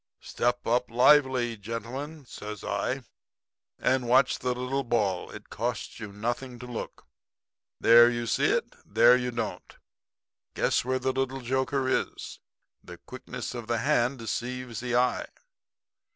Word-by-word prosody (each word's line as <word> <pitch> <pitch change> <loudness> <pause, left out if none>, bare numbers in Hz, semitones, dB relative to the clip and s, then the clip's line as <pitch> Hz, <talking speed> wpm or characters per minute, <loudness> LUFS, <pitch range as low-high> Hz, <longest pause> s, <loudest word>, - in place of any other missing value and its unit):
"'Step 120 0 -1
up 125 +2 +1
lively, 125 -1 +4
gentlemen,' 120 +8 -6
says 105 -4 -8
I, - - -2 0.7
'and 130 -1 +1
watch 130 +2 +4
the 125 - -5
little 130 +2 -2
ball. 105 -7 0
It - - -11
costs 115 -1 -3
you 105 -2 -7
nothing 120 +4 -4
to 125 - -9
look. 120 -2 -7 0.7
There 120 +1 +8
you 120 -1 -2
see 115 - +1
it, - - +1
and 100 - -26
there 120 +2 +7
you 125 0 -1
don't. 120 -1 -5 0.8
Guess - - +1
where 130 +1 0
the 130 +1 -1
little 135 0 -2
joker 130 +2 0
is. 130 - -2 0.4
The 90 0 -10
quickness 125 +2 -7
of 120 -3 -6
the 120 0 0
hand 120 +3 +1
deceives 120 +1 -4
the 125 -1 -2
eye. 125 +1 +1
120 Hz, 145 wpm, -28 LUFS, 115-130 Hz, 0.8 s, There